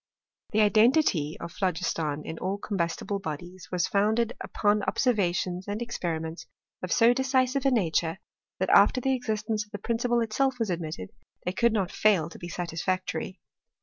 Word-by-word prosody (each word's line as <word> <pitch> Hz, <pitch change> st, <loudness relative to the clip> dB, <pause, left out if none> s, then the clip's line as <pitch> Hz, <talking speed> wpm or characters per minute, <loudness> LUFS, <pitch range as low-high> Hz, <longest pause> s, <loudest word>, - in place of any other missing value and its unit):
The 215 Hz, -1 st, +2 dB
identity 215 Hz, -, +3 dB
of 170 Hz, -, -6 dB
phlogiston 165 Hz, -5 st, -1 dB
in 160 Hz, -, -6 dB
all 190 Hz, +2 st, -2 dB
combustible 200 Hz, 0 st, -2 dB
bodies 175 Hz, +1 st, -7 dB
was 180 Hz, -1 st, +1 dB
founded 220 Hz, +4 st, +1 dB
upon 210 Hz, 0 st, +1 dB
observations 185 Hz, -6 st, 0 dB
and 205 Hz, +1 st, -3 dB
experiments 165 Hz, -8 st, -4 dB, 0.3 s
of -, -, -5 dB
so 235 Hz, +1 st, +5 dB
decisive 265 Hz, +1 st, +1 dB
a -, -, +6 dB
nature, 170 Hz, -6 st, +1 dB, 0.4 s
that -, -, 0 dB
after 255 Hz, -, +6 dB
the 265 Hz, +1 st, +1 dB
existence 220 Hz, -3 st, -1 dB
of 210 Hz, -, -22 dB
the 205 Hz, -, -6 dB
prin 230 Hz, +3 st, -2 dB
ciple 240 Hz, -1 st, +2 dB
itself 260 Hz, +4 st, 0 dB
was 225 Hz, -5 st, -1 dB
admitted, 155 Hz, -, -4 dB, 0.3 s
they 180 Hz, -, -1 dB
could 235 Hz, +3 st, +3 dB
not 195 Hz, -4 st, 0 dB
fail 185 Hz, -7 st, +2 dB
to -, -, -11 dB
be 175 Hz, -, -7 dB
satisfactory. 180 Hz, +2 st, -3 dB
205 Hz, 160 wpm, -27 LUFS, 175-230 Hz, 0.4 s, a